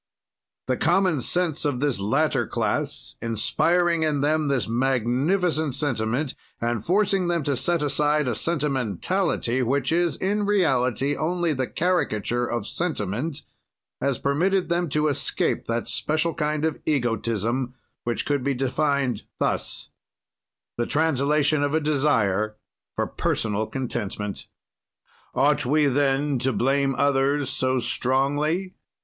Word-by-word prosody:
"The - - 0
common 185 -8 +2
sense 175 +1 +1
of 145 -5 0
this 140 -6 0
latter 100 +2 +1
class - - -2
inspiring 170 - +1
in 150 -3 +1
them 155 +1 +1
this 135 -4 0
magnificent 135 - +1
sentiment, 125 0 -1 0.3
and 120 -2 -1
forcing 195 0 +2
them 170 -2 0
to 140 0 0
set 170 +4 +1
aside 150 0 +1
a 120 - +1
sentimentality 135 - 0
which 130 +3 0
is, 170 0 +1
in 205 +2 -1
reality, 140 - +2
only 170 +1 0
the 130 -2 -2
caricature 120 - 0
of 120 0 -2
sentiment, 145 - -2 0.6
has 140 -2 0
permitted 180 +7 +1
them 170 -1 0
to 150 +2 +1
escape 145 - 0
that 115 0 -1
special 155 +2 0
kind 150 0 -1
of 160 - -1
egotism, 120 -1 -1 0.3
which 120 -1 -2
could 145 -3 0
be 140 0 0
defined 135 -2 0 0.2
thus: - - -2 0.9
The 120 - 0
translation 150 -1 +2
of 145 +1 +1
a - - +3
desire 115 -9 +1 0.4
for - - 0
personal 110 0 -1
contentment. 110 -6 -4 0.9
"Ought 145 +3 +3
we 150 +4 +2
then 140 0 +1
to 130 +2 +2
blame 135 +2 +1
others 140 0 +2
so 130 0 +1
strongly? 145 +10 0
140 Hz, 125 wpm, -24 LUFS, 125-160 Hz, 0.9 s, a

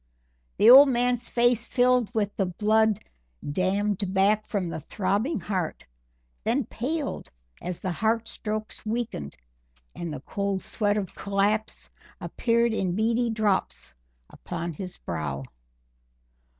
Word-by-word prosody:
The 225 - +8
old 275 +2 +10
man's 245 -1 0
face 240 -1 +2
filled 250 -2 +3
with 210 -3 -1
the 195 - 0
blood 215 +3 +2 0.5
dammed 190 +4 0
back 205 +2 +3
from 195 -4 -1
the 165 - -4
throbbing 205 - -1
heart, 180 -3 -3 0.6
then 240 +3 +1
paled 280 +7 -3 0.3
as 180 -1 -5
the 185 - -1
heart 225 +5 0
strokes 215 0 -5
weakened, 215 - -4 0.6
and 170 -2 -5
the 145 -4 -6
cold 200 +4 -2
sweat 205 -1 0
of 195 -4 -3
collapse 205 +2 -1 0.3
appeared 235 -1 +1
in 185 -5 -1
beady 230 +3 +1
drops 215 - 0 0.3
upon 170 -1 -6
his 180 +3 -7
brow. 75 -5 -4
210 Hz, 125 wpm, -26 LUFS, 185-230 Hz, 0.6 s, old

